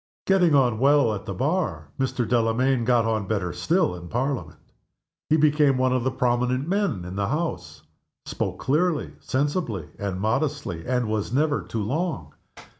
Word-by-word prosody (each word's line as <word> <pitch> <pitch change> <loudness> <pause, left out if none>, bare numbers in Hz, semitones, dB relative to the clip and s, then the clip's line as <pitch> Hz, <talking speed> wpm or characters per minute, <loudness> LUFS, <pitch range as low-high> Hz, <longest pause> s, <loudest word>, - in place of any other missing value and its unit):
Getting 180 -5 +4
on 125 -5 +3
well 140 -3 +4
at 105 - -6
the 100 - -3
Bar, 100 - -1
Mr. 130 -3 -1
Delamayn 120 +1 +2
got 120 -2 +3
on 110 -3 -1
better 95 -5 -1
still 170 - +1
in 85 -1 -8
Parliament. 130 - -2 0.7
He 155 - +4
became 150 -3 +3
one 130 0 +2
of 130 -2 0
the 130 - +1
prominent 125 +1 0
men 185 - 0
in 90 +1 -7
the 100 0 -1
House. 160 +6 -3 0.4
Spoke - - -3
clearly, 155 +3 0
sensibly, 135 - -2
and 100 -2 -3
modestly, 110 - -2
and 125 -2 0
was 110 -1 -2
never 145 +2 +1
too 110 -2 -4
long. 140 - -3
125 Hz, 160 wpm, -24 LUFS, 110-145 Hz, 0.7 s, Getting